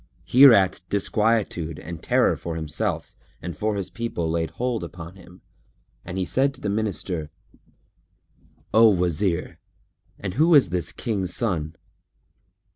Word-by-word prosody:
Hereat 115 -10 +6
disquietude 100 -6 0
and 85 0 -8
terror - - +2
for 85 -1 -6
himself 80 -2 -3 0.2
and 85 -2 -6
for 105 +6 -1
his 100 -2 -4
people 115 -8 -3
laid 80 0 -1
hold 120 +1 -3
upon 85 0 -9
him 90 -1 -16 0.6
and 90 - -6
he 95 - 0
said 135 +5 +1
to 130 - -13
the 105 - -2
Minister, 95 -6 -2 1.4
"O 110 +1 +7
Wazir, 90 -1 0 0.6
and 95 -3 -5
who 160 - +4
is 135 - +5
this 85 -1 -2
King's 95 -6 -3
son?" 85 -9 -2
95 Hz, 130 wpm, -24 LUFS, 85-110 Hz, 1.4 s, O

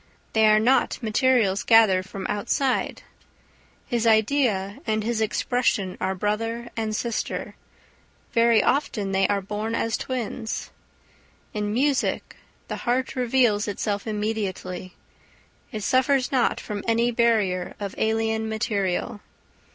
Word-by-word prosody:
They 220 -1 +5
are 215 0 +6
not 245 +5 +2
materials 220 -3 +2
gathered 195 -5 +4
from 195 -1 -6
outside. 255 +6 -1 0.8
His 235 -2 0
idea 220 -3 +2
and 215 -1 0
his 230 0 -1
expression 215 -4 0
are 190 +1 0
brother 225 +4 -2
and 220 -1 -2
sister; 235 0 -3 0.8
very 230 -2 +4
often 215 -8 0
they 190 0 +2
are 200 -1 0
born 210 +3 -3
as 225 -1 0
twins. 240 -2 -4 0.8
In 210 -1 -2
music 270 +4 0 0.3
the - - -4
heart 255 +3 -1
reveals 240 -4 +2
itself 205 +1 -2
immediately; 200 -4 -3 0.8
it 215 -4 -5
suffers 260 +2 +2
not 255 -3 +2
from 205 -2 -5
any 230 +1 +2
barrier 215 -6 +1
of 200 -2 -4
alien 220 0 0
material. 205 -2 -2
220 Hz, 120 wpm, -24 LUFS, 205-235 Hz, 0.8 s, are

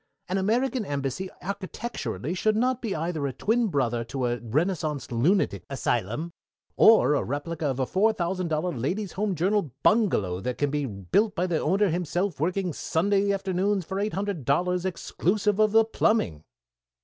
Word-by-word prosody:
An 185 +2 0
American 240 +5 +1
Embassy 145 +3 -3
architecturally 195 - -4
should 215 +4 +1
not 250 +2 +1
be 220 -5 -2
either 160 -2 -2
a 135 - -4
twin 225 - +1
brother 120 - 0
to 130 +1 -3
a 120 0 -1
Renaissance 150 - -1
lunatic 120 - +1
asylum, 135 - -2 0.4
or 220 -9 +6
a 145 - +1
replica 150 +3 -3
of 135 -1 -2
a 130 - +2
four 205 - +3
thousand 185 -2 -2
dollar 165 +2 -1
Ladies' 180 - -2
Home 205 -1 -1
Journal 185 -1 +1
bungalow 105 - +2
that 125 +6 -3
can 145 -1 0
be 145 -2 -1
built 115 - 0
by 180 - +1
the 170 -4 0
owner 200 +1 +2
himself 175 0 -1
working 180 +2 0
Sunday 200 +7 +1
afternoons 195 0 0
for 190 +3 -3
eight 210 +1 -1
hundred 195 -6 -2
dollars, 180 +7 +1
exclusive 200 +3 0
of 215 -1 +4
the 225 +1 +5
plumbing." 215 - 0
180 Hz, 165 wpm, -26 LUFS, 145-205 Hz, 0.4 s, or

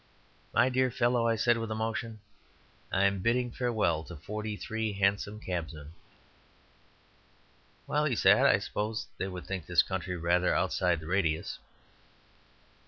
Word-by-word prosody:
"My - - +4
dear 130 0 +2
fellow," 120 -1 +1
I 115 - +2
said, 115 +1 +2
with 115 -1 -4
emotion, 110 0 -3 0.7
"I 95 - +2
am 100 0 +2
bidding 120 +4 +1
farewell 110 -11 0
to 85 - -9
forty 105 +6 -5
three 110 0 -3
hansom 100 +1 0
cabmen." 80 -6 -5 1.9
"Well," 150 +1 +1
he 135 -5 +1
said, - - +5
"I - - +5
suppose 105 +1 -3
they 95 - -1
would 90 -2 -7
think 95 -5 -5
this 90 -1 +4
county 95 -1 -3
rather 90 +1 +2
outside 90 -3 +1
the - - -9
radius." 80 -2 -1
100 Hz, 140 wpm, -30 LUFS, 90-115 Hz, 1.9 s, said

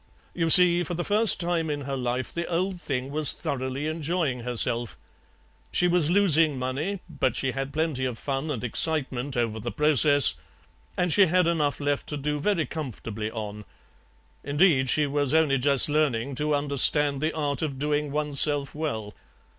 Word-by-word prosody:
You 165 -1 -1
see, 175 0 +7
for 175 0 -4
the 175 - -3
first 215 +3 +2
time 170 -2 -2
in 145 -1 -4
her 135 0 -5
life 125 0 -4
the 170 0 -4
old 180 +1 -3
thing 135 -3 -4
was 150 -1 +4
thoroughly 130 +1 -5
enjoying 155 -3 -2
herself; 120 -1 0 0.7
she 180 - +2
was 175 -3 +1
losing 165 -6 +3
money, 145 +10 -4
but 130 -3 -2
she 135 - 0
had 135 +1 -5
plenty 150 -4 -2
of 125 -3 -4
fun 135 +4 -4
and 125 -6 -4
excitement 135 0 0
over 115 -2 -2
the 120 +2 -5
process, 145 -2 +4 0.6
and 180 -2 0
she 200 -2 +4
had 180 +2 +2
enough 150 -4 -1
left 145 -1 -2
to 150 - -5
do 150 +1 -3
very 170 -1 -1
comfortably 115 -7 -6
on. 105 -2 -7 0.8
Indeed, 145 -2 +2
she 150 +2 +2
was 145 0 -1
only 150 -4 +2
just 140 0 +5
learning 140 -4 -1
to 150 +3 -1
understand 145 0 +3
the 155 +1 -2
art 145 -3 -3
of 145 -4 -4
doing 150 +1 -2
oneself 145 -1 0
well. 110 -10 -5
145 Hz, 170 wpm, -25 LUFS, 130-160 Hz, 0.8 s, see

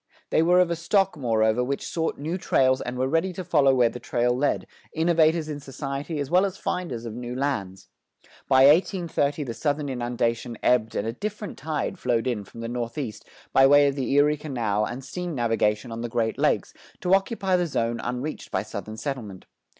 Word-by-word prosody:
They - - +4
were 175 +2 +4
of 180 -1 +3
a - - +1
stock, 195 +3 +1
moreover, 115 -3 +1
which 135 +2 -3
sought 165 -1 -2
new 160 +5 -3
trails 130 -5 +2
and 125 +1 -4
were 130 +1 +1
ready 165 +6 +1
to 185 - -5
follow 140 -6 +3
where 125 -2 +5
the 120 +1 -6
trail 120 0 0
led, 140 +3 0 0.3
innovators 160 -1 +2
in 150 -2 -5
society 140 +3 -5
as 140 0 -3
well 180 +2 +5
as 195 -1 -2
finders 165 -14 -3
of 115 - -5
new 120 +1 -6
lands. 110 -9 -3 0.6
By 130 -1 +6
1830 155 -2 +2
the 120 -4 -5
Southern 145 +2 -1
inundation 120 -1 -2
ebbed 115 -3 +2
and 100 - -1
a 115 - -2
different 210 - -5
tide 155 +1 -3
flowed 120 -2 0
in 120 -5 -1
from 115 - -11
the 115 - -4
northeast 120 0 -5 0.3
by 135 0 +7
way 145 +1 +6
of 140 - +1
the 135 -3 -2
Erie 145 +1 +4
Canal 115 -8 -1
and 130 +4 -6
steam 180 -3 -5
navigation 115 -2 0
on 115 0 -5
the 120 - -3
Great 110 -1 -1
Lakes - - +1 0.3
to 180 - +1
occupy 195 -1 +2
the 175 -1 +1
zone 115 -5 -1
unreached 125 +6 -4
by - - -1
Southern 110 0 -7
settlement. 110 -9 -5
135 Hz, 195 wpm, -25 LUFS, 120-160 Hz, 0.6 s, by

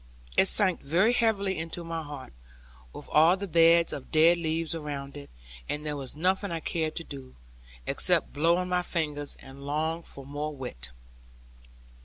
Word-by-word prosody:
It - - +5
sank 190 -3 +4
very 185 - +2
heavily 200 -6 +1
into 165 +1 -5
my 165 -1 -4
heart, 145 - -9 0.6
with - - -11
all 165 +5 +5
the 200 - -4
beds 170 -1 +4
of 135 - -8
dead 165 +2 +5
leaves 165 0 -1
around 145 -3 -5
it, 145 -1 -9 0.4
and 150 +1 -3
there 150 -1 -2
was 135 -1 -5
nothing 190 +5 0
I 165 - -2
cared 160 -1 -2
to 165 - -3
do, 135 -4 -10 0.5
except - - +2
blow 165 +4 +3
on 180 0 -2
my 180 0 +1
fingers, 150 -5 -3
and 135 +1 -13
long 155 +3 -1
for 140 -4 -8
more 145 +2 -4
wit. 65 - -5
160 Hz, 170 wpm, -28 LUFS, 145-170 Hz, 0.6 s, It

